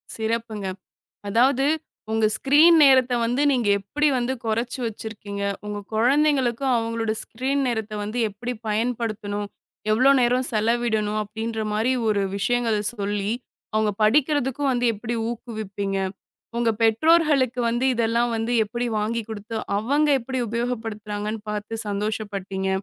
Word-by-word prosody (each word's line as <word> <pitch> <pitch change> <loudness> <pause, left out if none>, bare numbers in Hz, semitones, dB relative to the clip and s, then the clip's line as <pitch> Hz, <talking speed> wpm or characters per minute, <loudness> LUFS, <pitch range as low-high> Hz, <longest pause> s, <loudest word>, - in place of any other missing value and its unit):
சிறப்புங்க. 220 -2 -3 0.6
அதாவது 255 +5 +3 0.5
உங்க 220 -1 +3
ஸ்கிரீன் 305 +7 +6
நேரத்தை 260 -3 +5
வந்து 245 +5 +1
நீங்க 245 -5 +1
எப்படி 295 +10 0
வந்து 250 +1 0
குறைச்சு 230 +3 -1
வச்சிருக்கீங்க. 210 -2 -6 0.2
உங்க 210 0 -4 0.2
குழந்தைகளுக்கும் 265 0 +2
அவங்களோட 230 -1 -1
ஸ்கிரீன் 270 +4 -2
நேரத்தை 220 -3 -3
வந்து 215 +4 -4
எப்படி 240 +5 -5 0.2
பயன்படுத்தணும், 215 -2 -2 0.5
எவ்ளோ 255 +5 +5
நேரம் 250 +1 +2
செலவிடணும்? 220 -1 +1
அப்படின்ற 220 +2 -4
மாதிரி 220 +4 +1 0.2
ஒரு 205 -2 +2
விஷயங்களை 230 0 +1
சொல்லி 205 -1 -2 0.4
அவங்க 215 -1 +2
படிக்கிறதுக்கு 270 +3 +2
வந்து 245 0 0
எப்படி 225 +3 -4 0.2
ஊக்குவிப்பீங்க? 205 -4 -4 0.6
உங்க 235 -1 +2
பெற்றோர்களுக்கு 270 +1 +3
வந்து 240 +2 0
இதெல்லாம் 235 +1 +1
வந்து 225 +2 -2
எப்படி 240 +3 -3
வாங்கி 230 +2 -1
கொடுத்து, 220 +1 -6 0.2
அவங்க 285 +8 +1
எப்படி 260 +2 -4
உபயோகப்படுத்துறாங்கன்னு 220 -2 -3
பார்த்துச் 210 +2 -4
சந்தோஷப்பட்டீங்க. 200 -2 -3
230 Hz, 120 wpm, -24 LUFS, 215-250 Hz, 0.6 s, ஸ்கிரீன்